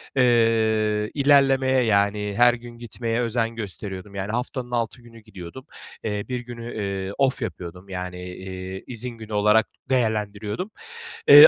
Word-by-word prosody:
eee, 110 -4 +3
ilerlemeye, 135 -2 +5
yani, 105 -1 +2
her 120 0 +7
gün 120 0 -9
gitmeye 115 0 -2
özen 115 -1 0
gösteriyordum, 100 -1 -6
yani, 100 +1 -2
haftanın 125 +1 -3
6 120 +1 -1
günü 115 -1 -14
gidiyordum. 95 +5 -10 0.4
Eee, 105 -2 -2
1 125 - -1
günü, 120 -1 -7
eee, 100 -2 -2
off 135 -1 +2
yapıyordum, 90 -4 -6
yani, 90 -1 -5
iii, 95 +1 -6
izin 125 0 -3
günü 110 -2 -9
olarak 105 +2 +4 0.2
değerlendiriyordum. 110 - 0 0.6
Eee, 470 - +13
110 Hz, 135 wpm, -24 LUFS, 100-120 Hz, 0.6 s, Eee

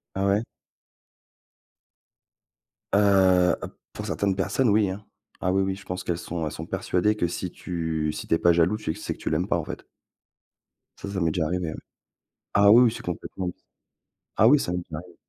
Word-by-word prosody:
Ah 95 - 0
ouais? 100 +3 +2 2.5
Heu, 95 -3 +5
p - - -5 0.3
pour - - -6
certaines 100 -2 0
personnes 100 +6 +1
oui, 105 -1 +3
hein. 100 +3 -6 0.4
Ah 90 - +1
oui 95 +1 +2
oui, 95 0 -1
je 100 - -13
pense 90 +1 -4
qu'elles 85 -1 -1
sont 85 -2 -4
elles 75 - -3
sont - - -7
persuadées 105 +4 0
que 90 -5 0
si 90 +1 -4
tu 80 -3 -2
si - - -7
tu - - +1
es - - +1
pas 85 -1 +5
jaloux, 85 +5 +2
tu 105 -7 -3
sais - - -4
que - - -17
tu - - -3
l'aimes 85 +4 0
pas 85 - +1
en 85 - -4
fait. - - -7 1.1
Ça, 100 - -7
ça 95 - -2
m'est 85 -3 +1
déjà 80 -1 0
arrivé 90 0 -2
ouais. - - -5 0.8
Ah 100 0 +6
oui 120 +3 +8
oui, 120 - +4
c'est - - -8
complètement 90 +1 -4 0.9
ah 110 - +6
oui, 145 +2 +6
ça 90 - -2
m'est 90 - -1
déjà 85 -3 -7
arrivé. 90 0 -12
90 Hz, 205 wpm, -25 LUFS, 85-100 Hz, 2.5 s, oui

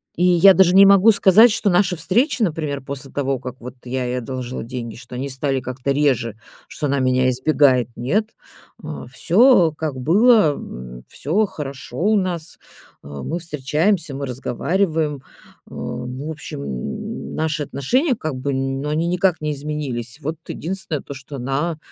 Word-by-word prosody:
И 175 - 0
я 180 +2 +7
даже 185 -1 +4
не 195 +1 +9
могу 200 +3 +7
сказать, 210 +3 +6
что 215 -1 0
наши 180 0 +2
встречи, 235 - +1
например, 155 - -1
после 135 0 -7
того, 135 -1 -1
как 125 -1 -7
вот 125 +1 -9
я 125 0 -3
ей 125 +1 -2
одолжила 125 0 -5
деньги, 120 -1 -6
что 120 0 -11
они 135 +3 -4
стали 135 0 -1
как-то 130 +1 -3
реже, 130 -6 +1 0.3
что 150 - -4
она 140 0 0
меня 130 0 +2
избегает, 130 -2 +3
нет. 195 - 0 0.5
Э, - - -7
всё 190 -3 +4
как 155 -3 -3
было, 205 - +4
м, - - -9
всё 190 +10 0
хорошо 140 -7 -8
у 210 +5 +2
нас, 175 -4 -3 0.4
э, - - -12
мы 75 - -5
встречаемся, 155 +1 -1
мы 140 +1 -4
разговариваем. 155 +5 -1
Э, - - -15 0.5
ну, 130 +4 -5
в 160 - -3
общем, 150 - -7
н 65 -3 -5
наши 155 -1 -1
отношения 250 - 0
как 155 -9 -4
бы 135 +2 -3
ну, 135 +2 -2
они 160 +3 0
никак 180 -1 +1
не 150 0 -1
изменились. 140 -5 -5
Вот 155 +3 -4
единственное 170 -4 -4
то, - - -8
что 135 +1 -10
она 140 +6 -2
145 Hz, 165 wpm, -21 LUFS, 130-175 Hz, 0.5 s, не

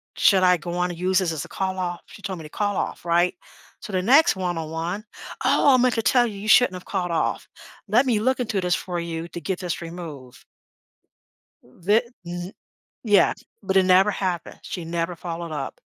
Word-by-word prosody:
"Should 190 -3 +4
I 180 -1 +5
go 170 +2 -6
on 180 0 0
and 170 - -9
use 185 +1 +2
this 180 -3 0
as 155 -3 -4
a - - -11
call 190 -1 -3
off?" 175 -1 -3
She - - -14
told 195 -2 -4
me - - -8
to 150 - -10
call 205 +4 -1
off, - - -3
right? 175 +1 +2 0.4
So 210 - -9
the 185 - +1
next 275 +7 +5
one-on-one, 175 +2 -3 0.4
"Oh, 280 - +5
I - - +6
meant 250 -1 +3
to 225 - +1
tell 245 0 +4
you, 210 -3 -7
you 210 - -7
shouldn't 245 -3 +6
have 180 - -9
called 180 -3 -2
off. 165 - -1 0.4
Let 230 +7 +4
me 235 -5 +2
look 260 +4 +1
into 215 -4 -1
this 180 -1 +1
for 175 -2 -4
you 165 0 -4
to 170 - -7
get 185 +3 -3
this 175 -3 -3
removed." 165 -7 -9 1.2
Thi 185 - +1 0.2
th 175 +2 -6 0.5
Yeah. 205 -4 +4 0.3
But 190 - +1
it 190 - +6
never 190 +3 +5
happened. 185 -4 -3
She 175 -3 -6
never 170 +1 -2
followed 170 -1 -6
up. 150 - -5
180 Hz, 205 wpm, -24 LUFS, 170-205 Hz, 1.2 s, I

